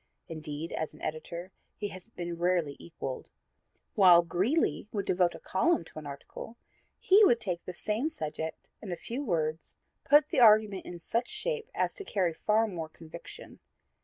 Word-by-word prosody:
Indeed, 155 -1 -6
as 155 -1 -3
an - - -16
editor 170 +4 -5 0.3
he 205 - -3
has 185 0 -10
been 175 -6 -6
rarely 175 -5 +1
equaled. 135 -6 -6 0.6
While 180 -4 +7
Greeley 195 - +1
would 200 -3 -2
devote 180 -1 +2
a - - -9
column 315 - +1
to 155 - -9
an 150 - -9
article, 140 +10 -9 0.4
he 400 +3 +6
would 240 - +5
take 180 -6 -3
the 180 - -5
same 215 - -1
subject 160 - -5
and 210 - -7
in - - -1
a - - -5
few 255 +5 -4
words 160 - -2 0.3
put 295 0 +5
the - - +1
argument 215 -4 +5
in 175 - -6
such 230 +8 -1
shape 455 +2 -3
as - - 0
to 405 - -6
carry 185 - 0
far 215 +6 +2
more 170 -7 -5
conviction. 160 0 -11
180 Hz, 175 wpm, -30 LUFS, 165-225 Hz, 0.6 s, While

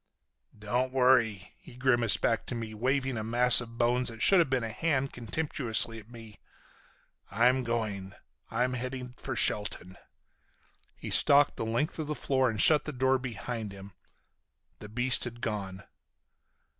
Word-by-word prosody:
"Don't 125 +5 -2
worry," 125 -7 +1
he - - -16
grimaced 120 -4 +1
back 115 - -1
to 125 - -5
me, 115 -2 -6
waving 130 +3 -1
a - - -4
mass 120 +2 +6
of 115 -1 -11
bones 125 +1 +1
that 115 -1 -6
should 195 - +6
have 165 - +2
been 130 -2 -1
a 115 - -4
hand 135 0 -2
contemptuously 115 -2 0
at 110 +1 -17
me, 115 -3 -13 0.9
"I'm 125 +4 +2
going. 105 -5 -4 0.3
I'm 125 +3 -1
headed 125 0 -6
for - - -5
Shelton." 95 -2 -1 1.0
He - - -8
stalked 145 0 +4
the 110 - -5
length 120 +9 -2
of 155 - -4
the 150 - -3
floor 130 -3 0
and 110 -2 -5
shut 150 +6 +5
the 150 - -4
door 130 +1 +1
behind 115 -3 -6
him. 100 0 -12 0.9
The 105 - -11
beast 125 +3 +1
had 120 0 -8
gone. 100 -5 -5
120 Hz, 155 wpm, -28 LUFS, 110-130 Hz, 1.0 s, mass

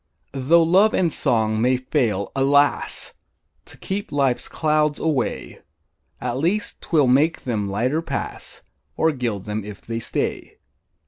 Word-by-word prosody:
Tho' 145 +6 +4
love 190 +6 +4
and 170 -5 +1
song 110 -2 +1
may 125 +2 +3
fail, 120 -7 -1
alas! 140 +1 +2 0.5
To - - -12
keep 200 +1 -4
life's 135 -4 +1
clouds 150 -1 +1
away, 150 -6 -2 0.6
At 125 +1 -3
least 190 +8 -1
'twill 155 -4 +2
make 140 +6 +2
them 105 -5 -2
lighter 125 +10 0
pass, 165 - -5 0.3
Or 160 - +3
gild 120 -8 -3
them 105 0 -3
if 105 -1 -9
they 115 0 -4
stay. - - -3
135 Hz, 135 wpm, -22 LUFS, 115-160 Hz, 0.6 s, Tho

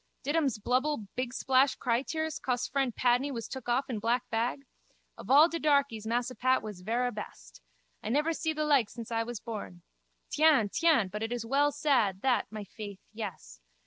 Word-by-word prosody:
Did 290 +3 -1
ums 280 -8 +1
blubble 250 0 -1
bigsplash 260 +2 +2
crytears 280 +6 -1
cos 245 -1 -1
fren 270 -3 0
Padney 245 +4 +2
was 230 -4 -5
took 260 -2 -7
off 260 +4 +1
in 240 -6 -3
black 235 +3 0
bag? 240 +5 -1 0.5
Of - - -11
all 290 +5 +8
de 335 -1 -4
darkies 280 -8 +1
Massa 240 +2 -1
Pat 255 +2 +1
was 210 -4 -7
verra 240 +5 0
best. 210 - -9 0.4
I - - -5
never 300 +7 +1
see 320 0 -1
the 305 0 -1
like 275 -8 +3
since 235 -1 -9
I 225 0 +1
was 230 -1 -5
born. 205 -7 -7 0.5
Tiens, 295 -10 +4
tiens, 310 - +3
but 210 +2 -5
it 225 +1 -3
is 240 -2 -3
well 285 +4 +2
sad, 245 -11 +1
that, 260 -2 +2
my 215 -1 -6
faith, 200 0 -8 0.2
yes. - - -7
245 Hz, 185 wpm, -30 LUFS, 220-280 Hz, 0.5 s, all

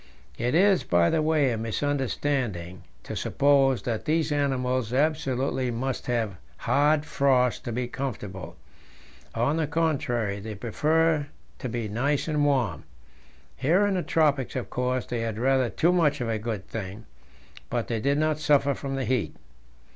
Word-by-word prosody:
It 120 +4 0
is, 195 +2 +4
by 85 -1 +3
the 160 - +2
way, 155 -4 +2
a 115 - -2
misunderstanding 120 -7 -2 0.2
to - - -6
suppose 135 -2 +2
that 115 -3 -3
these 160 0 +1
animals 130 -4 0
absolutely 135 -2 0
must 125 +2 -3
have 115 -6 -1 0.2
hard 150 +1 +2
frost 130 -4 +2
to 120 - -3
be 125 +2 -2
comfortable; 105 -8 -6 0.8
on 125 +7 +1
the 160 -2 0
contrary, 130 -10 0
they 105 +1 -6
prefer 155 +8 +1 0.3
to 130 - -4
be 115 -1 -3
nice 135 +9 0
and 150 -2 +1
warm. 125 - +1 0.7
Here 170 +10 +3
in 205 - +1
the 185 - 0
tropics 145 -6 +1
of 130 - -4
course 125 0 -1
they 120 - -3
had 115 -2 -3
rather 130 0 +2
too 170 +8 +2
much 150 -5 +2
of 120 -2 -2
a 110 -1 -1
good 105 -3 -4
thing, 105 +1 -6 0.6
but - - -2
they 115 -2 -1
did 140 +5 +1
not 155 0 +1
suffer 145 -2 +3
from 135 0 -5
the 135 -1 -2
heat. 125 -1 -1
130 Hz, 160 wpm, -26 LUFS, 115-145 Hz, 0.8 s, is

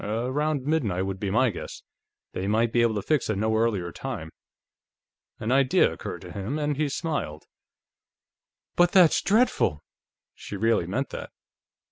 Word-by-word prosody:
Around 130 +7 -1
midnight, 115 - 0
would 95 0 -4
be 100 - -2
my 120 +4 +3
guess. 90 - -8 0.5
They 95 - -3
might 115 +2 +1
be 120 - +4
able 115 -2 +2
to 105 - -2
fix 150 -7 0
a 110 - +1
no 110 +2 0
earlier 105 -6 0
time." 105 -12 -6 1.1
An 110 - -2
idea 135 -1 +4
occurred - - -7
to - - -10
him, 100 +9 -4
and 150 -1 -1
he 150 +1 0
smiled. 135 - -3 1.3
"But 175 0 +4
that's 180 -4 +6
dreadful!" 195 - +2 0.5
She - - -8
really 110 -4 +1
meant 130 +9 -2
that. - - -6
115 Hz, 155 wpm, -26 LUFS, 100-145 Hz, 1.3 s, that's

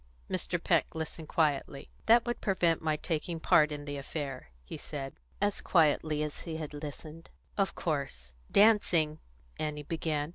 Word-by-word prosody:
Mr. - - 0
Peck - - +2
listened 160 0 -5
quietly. 145 -3 0 0.2
"That 235 +1 +6
would 240 0 -2
prevent 175 -5 +2
my 155 -1 +1
taking 165 +1 -3
part 155 -1 +5
in 145 -1 -5
the 145 0 -4
affair," 140 - -5
he - - -7
said, 135 -2 -6 0.3
as 205 0 +1
quietly 155 -2 +3
as 150 -1 -4
he 160 -2 -5
had 155 -2 -5
listened. 150 +2 -8 0.3
"Of 195 -1 0
course 135 - -3 0.2
dancing," 180 -8 +4 0.4
Annie 150 -1 -2
began. 155 -1 -2
155 Hz, 150 wpm, -31 LUFS, 145-165 Hz, 0.4 s, That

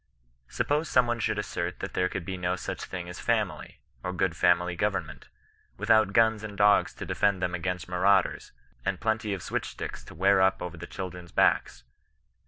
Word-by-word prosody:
Suppose 150 +3 -1
some 125 -1 +4
one 120 0 -1
should 110 - 0
assert 90 -4 -3
that - - -6
there 90 0 +1
could 85 - -5
be 95 - -3
no 90 0 -1
such 90 - -5
thing 90 -2 -6
as 90 - -8
a - - -7
family, - - -1 0.3
or 90 - -2
good 90 -1 0
family 90 +1 +3
government, - - -2 0.5
without 110 0 +4
guns 110 0 +3
and 100 -2 -7
dogs 105 0 +4
to - - -6
defend 100 -2 +1
them 90 -1 -1
against 90 +1 -3
marauders, 95 +1 +2 0.3
and 95 -2 -1
plenty 110 -1 -1
of 95 -3 -3
switchrSticks - - -4
to - - -12
wear 95 +3 +4
up 95 0 +3
over 90 -1 -5
the 85 +1 -8
children's 90 -2 -7
backs. - - +2
95 Hz, 190 wpm, -28 LUFS, 90-105 Hz, 0.5 s, some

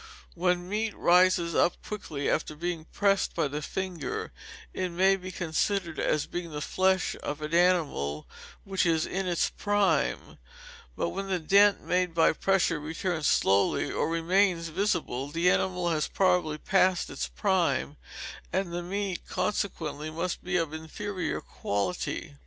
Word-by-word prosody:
When 180 0 0
meat 215 +2 -2
rises 175 -1 +4
up 175 - +3
quickly, 155 -9 -4
after 155 - 0
being 170 0 -3
pressed 200 +1 +1
by - - +1
the 145 +2 -4
finger, 180 0 -4 0.4
it 185 -1 -2
may 190 +3 +3
be 185 -1 -7
considered 175 0 -1
as 155 - +1
being 175 -1 -5
the 150 -2 -5
flesh 185 +4 +1
of 145 +1 -4
an 155 +1 -5
animal 160 - +1 0.4
which 195 -1 0
was 165 -2 +2
in 190 0 -3
its 175 -1 +1
prime; 195 - 0 0.6
but 85 - -1
when 195 - -4
the 190 -1 0
dent 200 +5 +4
made 180 -1 0
by 165 - +4
pressure 180 -2 +1
returns 160 +1 -2
slowly, 100 +1 +2
or - - 0
remains 165 +1 +2
visible, 165 -7 -1
the 170 +4 +2
animal 180 -2 0
had 155 -2 0
probably 180 -5 +2
passed 185 +1 +2
its - - -3
prime, 170 -8 0 0.6
and 185 -1 -1
the 175 - -2
meat 190 +1 -3
consequently 155 -7 -2
must 170 +3 -3
be 180 0 0
of 165 -3 -1
inferior 170 +3 -4
quality. 95 -7 -3
175 Hz, 145 wpm, -28 LUFS, 155-190 Hz, 0.6 s, rises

